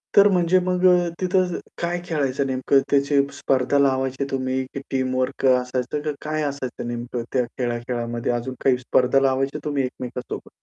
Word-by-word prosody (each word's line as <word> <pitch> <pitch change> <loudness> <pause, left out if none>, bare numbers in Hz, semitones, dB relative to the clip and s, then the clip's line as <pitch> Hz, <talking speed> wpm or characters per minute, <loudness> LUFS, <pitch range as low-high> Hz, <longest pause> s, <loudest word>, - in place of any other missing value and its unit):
तर 200 0 +8
म्हणजे 180 0 +3
मग 180 0 +1
अ, 175 -1 +4
तिथं 185 -1 +1 0.2
काय 175 +1 -1
खेळायचं 140 -4 0
नेमकं? 130 +1 +2
त्याची 140 0 +3 0.2
स्पर्धा 135 +1 +1
लावायचे 135 0 +1
तुम्ही? 130 0 -1
की - - -4
टीमवर्क 130 0 -1
असायचं, 125 +2 +1
की 150 0 -2
काय 155 0 -2
असायचं 135 -4 -4
नेमकं 120 0 -4
त्या 125 -2 +3
खेळा-खेळामध्ये? 120 -1 -3
अजून 120 +2 -3
काही 130 -2 +4
स्पर्धा 125 +1 +2
लावायची 135 +1 +1
तुम्ही 145 -2 0
एकमेकांसोबत? 125 -1 -6
135 Hz, 150 wpm, -23 LUFS, 125-150 Hz, 0.2 s, तर